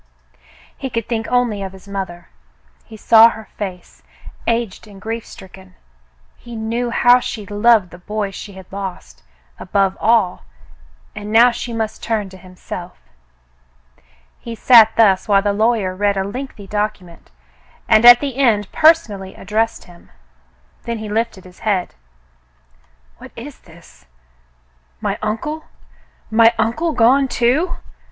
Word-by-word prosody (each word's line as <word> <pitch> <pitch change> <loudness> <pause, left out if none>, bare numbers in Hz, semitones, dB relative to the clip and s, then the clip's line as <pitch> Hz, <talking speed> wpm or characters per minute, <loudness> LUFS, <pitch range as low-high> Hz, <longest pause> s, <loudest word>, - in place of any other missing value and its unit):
He 270 - -6
could 230 -3 -4
think 225 -1 -3
only 245 -5 0
of 190 -1 -6
his 190 +1 -15
mother. 190 -3 -6 0.6
He 220 - -12
saw 225 +1 +7
her 220 -1 -10
face, 185 -3 -7 0.5
aged 230 -3 -2
and 200 -2 -14
grief 225 +2 -5
stricken. 190 -1 -14 0.6
He 240 -1 -11
knew 230 +2 -2
how 245 +1 +5
she 215 -4 -6
loved 205 -1 +2
the 175 - -12
boy 210 +2 -4
she 200 +1 -9
had 190 -1 -12
lost, 190 - -7 0.4
above 195 0 0
all, 220 - +2 0.7
and 205 0 -7
now 235 +3 +6
she 235 0 -6
must 220 -1 -4
turn 215 -4 -2
to 190 - -13
himself. 180 -1 -10 1.4
He 230 -1 -8
sat 225 -1 +6
thus 195 -4 +4
while 200 -2 +3
the 205 -1 +1
lawyer 215 -3 0
read 200 +1 0
a 190 - 0
lengthy 230 0 -7
document, 195 -4 -5 0.6
and 220 +1 +4
at 240 0 +9
the 275 -3 -4
end 220 -7 +1
personally 225 - +2
addressed 220 +3 -2
him. 175 -1 -18 0.7
Then 235 -1 -4
he 215 -1 -7
lifted 220 -3 -2
his 180 -1 -16
head. 195 -4 -1 1.3
"What - - -11
is - - -10
this? - - -19 0.9
My - - -3
uncle 225 +9 -3
.'^ - - -25 0.7
My 225 +1 +6
uncle 235 +10 0
gone, 260 +3 +4
too. 265 +9 0
215 Hz, 140 wpm, -18 LUFS, 195-235 Hz, 1.4 s, at